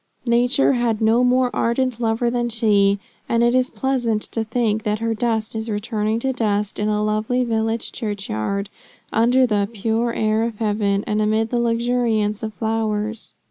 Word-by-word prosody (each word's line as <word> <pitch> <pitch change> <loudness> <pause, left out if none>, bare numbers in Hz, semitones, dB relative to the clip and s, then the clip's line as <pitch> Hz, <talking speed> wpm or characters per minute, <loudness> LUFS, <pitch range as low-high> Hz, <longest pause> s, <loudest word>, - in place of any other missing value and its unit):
Nature 245 +4 +3
had 235 -3 0
no 225 +3 +3
more 250 0 +3
ardent 240 0 0
lover 230 +1 0
than 240 0 -1
she; 205 -3 +3 0.3
and 235 0 +2
it 240 0 +3
is 255 0 +2
pleasant 240 -5 -1
to 225 - -3
think 220 -1 0
that 210 0 -1
her 230 +1 -1
dust 225 -1 -1
is 220 +1 -3
returning 215 +1 -1
to 265 +3 -1
dust 210 -4 -1
in 210 - 0
a 210 0 0
lovely 215 +4 0
village 225 -1 -1
church 210 -4 -4
yard, 200 - -2 0.4
under 245 +3 +4
the 205 -4 0
"pure 225 +2 -1
air 220 -1 +1
of 230 -2 -3
heaven, 205 -2 0
and 210 0 0
amid 220 +1 +1
the 240 - +1
luxuriance 230 -3 0
of 220 -1 -3
flowers." 220 +1 -2
225 Hz, 175 wpm, -21 LUFS, 215-240 Hz, 0.4 s, under